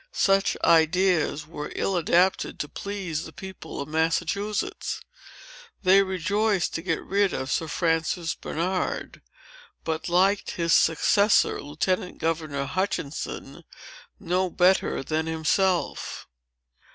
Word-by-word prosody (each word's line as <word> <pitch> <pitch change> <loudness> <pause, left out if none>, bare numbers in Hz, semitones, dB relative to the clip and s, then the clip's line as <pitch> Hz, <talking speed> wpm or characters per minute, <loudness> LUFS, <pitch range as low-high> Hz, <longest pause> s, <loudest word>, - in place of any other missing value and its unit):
Such 195 0 +2
ideas 165 -2 +3
were 150 -1 -7
ill 195 - 0
adapted 175 +2 +2
to 150 - -3
please 185 -4 -4
the - - -9
people 190 -1 -9
of 140 - -4
Massachusetts. 165 +6 -1 0.8
They 190 +1 +6
rejoiced 195 +1 0
to 165 - -3
get 165 -2 -2
rid 200 -1 +1
of 130 +1 -3
Sir 160 - 0
Francis 165 +1 0
Bernard, 180 +3 -3 0.6
but 160 +1 -3
liked 190 +3 +2
his 170 -1 +2
successor, 200 +6 +3
Lieutenant 180 +5 -2
Governor 155 -4 -2
Hutchinson, 160 -2 -4 0.6
no 185 +2 0
better 180 -4 +2
than 160 +2 -1
himself. 170 +3 0
175 Hz, 110 wpm, -25 LUFS, 160-190 Hz, 0.8 s, They